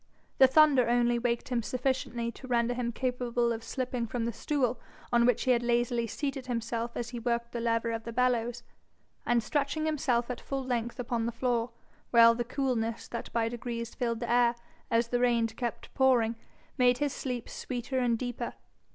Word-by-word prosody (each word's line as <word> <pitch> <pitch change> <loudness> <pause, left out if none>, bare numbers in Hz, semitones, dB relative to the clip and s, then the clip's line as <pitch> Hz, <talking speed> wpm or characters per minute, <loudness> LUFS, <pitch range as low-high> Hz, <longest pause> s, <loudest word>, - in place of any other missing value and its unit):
The 265 - +9
thunder 270 -3 +5
only 240 0 +3
waked 235 0 -1
him 245 -2 0
sufficiently 250 -1 -1
to 260 - -11
render 240 -1 +1
him 240 -1 -2
capable 245 -1 0
of 225 0 -6
slipping 250 -2 -3
from 230 0 -2
the 235 - -2
stool 250 -1 0 0.3
on 235 0 +5
which 245 - +2
he 255 - +3
had 240 -1 +3
lazily 240 0 +1
seated 275 +2 -4
himself 235 -1 -3
as 240 -1 -3
he 240 -1 -5
worked 235 0 -1
the 240 - -3
lever 230 0 0
of 225 0 -3
the 230 - -6
bellows, 240 0 0 0.6
and 240 -1 +3
stretching 290 +5 -1
himself 255 -6 0
at 250 - -6
full 270 -1 -3
length 240 -1 -2
upon 235 -1 -1
the - - -1
floor; 235 0 0 0.4
while 230 -1 +7
the 240 +1 -2
coolness 235 -3 -2
that 235 - -5
by 230 -1 +1
degrees 235 0 -5
filled 235 -1 -2
the 235 -1 -2
air 240 0 +4 0.3
as 230 0 +2
the 245 - +1
rain 240 -2 +3
kept 235 +1 -5
pouring, 245 -4 +3 0.4
made 245 -1 +5
his 290 0 -1
sleep 250 -3 -4
sweeter 255 +1 -3
and 240 -2 +2
deeper. 245 -1 -4
240 Hz, 185 wpm, -30 LUFS, 235-250 Hz, 0.6 s, The